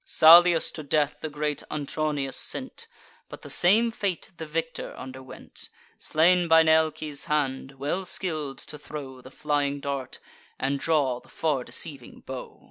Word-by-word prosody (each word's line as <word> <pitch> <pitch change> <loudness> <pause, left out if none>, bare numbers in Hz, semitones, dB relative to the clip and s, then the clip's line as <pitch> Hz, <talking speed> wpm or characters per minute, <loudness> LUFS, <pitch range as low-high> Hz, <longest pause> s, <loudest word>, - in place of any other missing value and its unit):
Salius 170 +1 +7
to 155 - -7
death 145 0 0
the 155 - -4
great 150 0 -3
Antronius 145 -2 -2
sent: - - -2 0.4
But - - -11
the - - -3
same 220 +6 +4
fate 200 -6 -3
the 160 - -7
victor 165 +1 -4
underwent, 130 0 -11 0.3
Slain 175 +3 +3
by 160 0 +6
Nealces' 155 -2 +1
hand, 135 -2 -1
well 145 +8 -3
skill'd 155 -7 -3
to 150 - -11
throw 135 -4 -8
The 130 - -12
flying 145 0 -1
dart, 140 -2 -4 0.4
and 140 +1 -1
draw 140 -6 +1
the - - -22
far 150 -6 -1
deceiving 145 +2 -6
bow. - - -8
150 Hz, 145 wpm, -26 LUFS, 140-160 Hz, 0.4 s, Salius